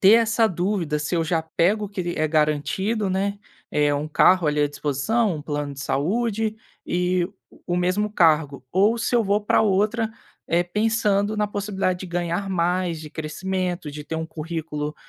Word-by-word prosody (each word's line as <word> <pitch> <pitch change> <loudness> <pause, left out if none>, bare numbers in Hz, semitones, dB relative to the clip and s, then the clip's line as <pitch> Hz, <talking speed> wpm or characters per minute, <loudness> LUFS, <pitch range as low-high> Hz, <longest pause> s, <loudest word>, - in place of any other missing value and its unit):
ter 195 - +7
essa 230 0 +4
dúvida 175 -4 -1
se 150 +4 -2
eu 165 -1 +1
já 160 0 0
pego 190 +6 +1
o - - -11
que 200 -1 -5
l 175 0 -3
é 155 0 +1
garantido, 160 +8 +1
né, 200 +2 -1 0.3
eh, 145 -1 +2
1 145 +1 -2
carro 180 +2 +4
ali 150 0 +1
à 145 - +3
disposição, 160 - 0
um 150 - -7
plano 145 -1 -3
de 135 - -9
saúde 215 - 0 0.3
e 180 0 +1
o 195 +3 -10 0.3
o 175 - 0
mesmo 185 +4 +1
cargo. 150 -7 +2
Ou 205 +5 +3
se 230 - -1
eu 230 - +3
vou 200 +2 +2
pra 210 - +3
outra, 215 +3 +1 0.4
eh, 170 +1 +2
pensando 210 +1 +1
na 210 0 +1
possibilidade 195 -3 -2
de 190 - -5
ganhar 175 +2 -2
mais, 175 -2 0
de 155 - -8
crescimento, 175 +1 -3
de 150 +1 -8
ter 160 - -4
um 160 0 -3
currículo 155 -2 -4
180 Hz, 185 wpm, -23 LUFS, 155-205 Hz, 0.4 s, ter